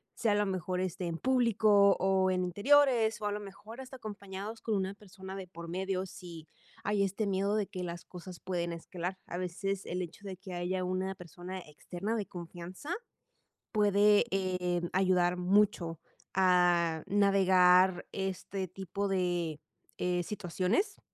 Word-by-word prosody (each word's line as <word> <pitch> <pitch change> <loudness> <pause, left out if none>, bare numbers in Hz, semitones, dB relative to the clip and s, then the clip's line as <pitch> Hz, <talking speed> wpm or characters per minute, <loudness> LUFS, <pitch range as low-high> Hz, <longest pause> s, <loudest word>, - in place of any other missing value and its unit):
sea 225 - +1
a - - +3
lo 205 0 +2
mejor, 185 -1 -2
este, 185 -1 -2
en 165 -1 -3
público 220 -4 +4
o 190 0 +3
en 185 0 +1
interiores, 230 - +4
o - - -3
a 205 - +1
lo 210 - -3
mejor 210 +5 -10
hasta 265 0 -10
acompañados 205 -1 -7
con 220 - 0
una 190 0 -1
persona 190 -1 -10
de 195 -1 -6
por 170 -1 -9
medio, 190 +2 -2
si 175 -4 -10 0.4
hay 205 -1 +2
este 200 +2 -1
miedo 200 +1 +1
de 205 -2 0
que 185 -3 -5
las 170 -1 -6
cosas 180 0 -10
pueden 175 -2 -2
escalar. 175 +2 -5
A 175 - -5
veces 190 +2 -3
el 180 +1 -3
hecho 175 +2 -7
de 190 -2 -6
que 190 -1 -9
haya 180 +1 -1
una 185 +1 -2
persona 180 +1 -8
externa 180 +6 -5
de 210 -3 -2
confianza 175 - -8 0.8
puede, 205 0 +5
eh, 180 -2 0
ayudar 180 -1 +3
mucho 180 -3 +2 0.3
a 175 -3 +3
navegar 185 -2 +5
este 190 0 -3
tipo 195 +2 -4
de, 175 -5 0 0.4
eh, 180 -1 +1
situaciones. 205 - -1
190 Hz, 155 wpm, -31 LUFS, 180-200 Hz, 0.8 s, puede